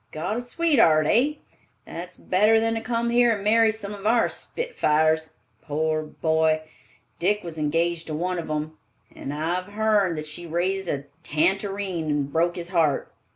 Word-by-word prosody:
Got 165 +7 -3
a - - -2
sweetheart, 245 - +3
hey? 275 - +2 0.4
That's 180 +2 -7
better 210 +4 +3
than 225 0 0
to 225 - -2
come 235 0 -1
here 240 -1 +4
and 200 - -7
marry 225 +1 +4
some 210 -2 -7
of 205 0 -5
our 230 +1 +3
spitfires. 160 - 0 0.3
Poor 155 +1 -1
boy! 160 0 +1 0.6
Dick 205 +4 +1
was 165 -2 -6
engaged 165 +2 0
to 155 - -3
one 180 +3 -2
of 165 - -6
'em, 155 +1 -4 0.4
and 140 - -6
I've 175 +6 -3
hearn 210 -5 +2
that 155 0 -5
she 160 +3 -8
raised 185 +3 -1
a 140 0 -2 0.2
tantareen 190 +1 -1
and 145 -1 -1
broke 170 +2 +1
his 175 -1 -5
heart. 160 -6 +1
175 Hz, 165 wpm, -24 LUFS, 155-215 Hz, 0.6 s, here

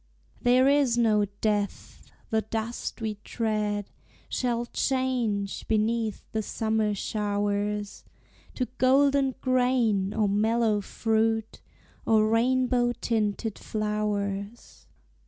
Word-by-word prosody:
There 250 +2 +4
is 280 -4 +3
no 215 -3 +3 0.2
death! 205 -2 -2 0.2
the 220 0 +2
dust 225 +3 -4
we 215 -2 -3
tread 210 -3 -2 0.4
Shall 240 -2 -1
change, 245 -7 -1
beneath 220 0 0
the 220 - -1
summer 220 -1 0
showers, 205 0 -2 0.5
To 255 - 0
golden 270 0 +3
grain, 245 -6 +2
or 215 -1 +1
mellow 215 +1 +2
fruit, 225 +1 -1 0.4
Or 215 -1 +3
rainbow 245 +1 +2
tinted 220 -1 -1
flowers. 210 0 -3
220 Hz, 95 wpm, -27 LUFS, 210-240 Hz, 0.5 s, There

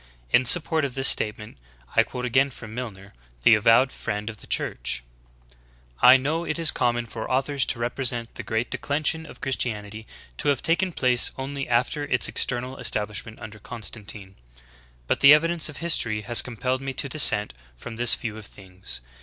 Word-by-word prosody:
In 130 - +4
support 160 +2 +3
of 140 -3 -2
ihis 135 +1 -2
state 105 -4 +3
ment, 105 - -12 0.4
I - - +6
quote 125 0 -5
again 130 +3 +2
from 115 -4 -11
Milner, 105 -5 -8 0.3
the - - +7
avowed 115 +5 +4
friend 105 +2 -4
of 110 - -15
the - - -15
Church: - - -2 1.0
"I 125 +1 +8
know 150 +6 -2
it 155 - -3
is 165 -3 +3
common 120 -1 0
for 110 -1 -7
authors 135 +1 0
to - - -1
represent 120 0 -1
the - - -7
great 110 +2 -3
declension 155 +2 -2
of - - -14
Christianity 110 -5 -3 0.3
to - - -3
have 140 -3 +1
taken 180 +3 +1
place 125 -6 +2
only 140 0 -5
after 125 +5 0
its 125 -3 +1
external 125 +1 -2
establishment 105 -1 -3
under 110 -1 -10
Constantine. 105 -3 -6 0.7
But - - 0
the 140 +2 +9
evidence 165 +1 0
of 145 - -10
history 115 -10 -1
has 115 +3 +5
compelled 125 +2 -3
me 135 0 -4
to 140 - -2
dissent 110 - +4 0.2
from 115 - -9
this 120 0 +5
view 110 -2 -6
of 110 - -12
things. 95 -8 -9
125 Hz, 180 wpm, -24 LUFS, 110-140 Hz, 1.0 s, the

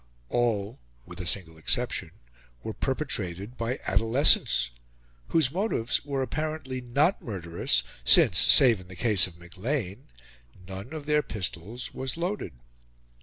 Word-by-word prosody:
All, 110 -3 -1 0.3
with 90 +1 -8
a 90 - -5
single 80 -4 -3
exception, 80 - -1 0.5
were 110 - -4
perpetrated 110 - -3
by 115 +3 -2
adolescents, 115 - +3 0.6
whose 155 -5 +2
motives 180 - -1
were 140 -2 -2
apparently 145 -1 -4
not 140 +9 +1
murderous, 85 - -1 0.2
since, - - +6
save 115 -7 +6
in 90 - -15
the 95 - -11
case 105 -3 +3
of 85 -2 -15
Maclean, 95 +4 -4 0.6
none 95 +6 -8
of 155 -2 -7
their 150 0 +2
pistols 105 - -5
was 130 +3 -4
loaded. 175 - -3
115 Hz, 125 wpm, -27 LUFS, 95-140 Hz, 0.6 s, since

